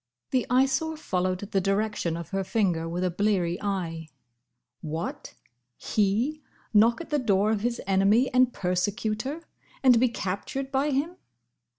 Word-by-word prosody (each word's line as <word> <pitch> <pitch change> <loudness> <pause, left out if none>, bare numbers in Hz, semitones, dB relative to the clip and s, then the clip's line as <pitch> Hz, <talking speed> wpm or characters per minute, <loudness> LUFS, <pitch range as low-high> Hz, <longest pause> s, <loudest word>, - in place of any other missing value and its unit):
The 255 -2 +1
Eyesore 270 +5 +2
followed 185 - -1
the 200 -1 -1
direction 195 -3 0
of 170 - -7
her 195 0 -1
finger 185 -5 0
with 175 +2 -2
a 180 - +1
bleary 180 -2 0
eye. 170 -5 -3 0.7
What! 160 +2 -5 0.4
He 225 +9 0 0.3
knock 230 +6 +4
at 330 - -10
the 295 - +2
door 210 -3 +2
of 215 -2 0
his 240 +1 -1
enemy 195 +7 +3
and 255 0 +4
persecutor! 215 - -2 0.4
and 250 -3 +6
be 255 +1 +3
captured 240 +6 -4
by 275 +2 +1
him! 295 +6 -1
210 Hz, 145 wpm, -27 LUFS, 185-255 Hz, 0.7 s, and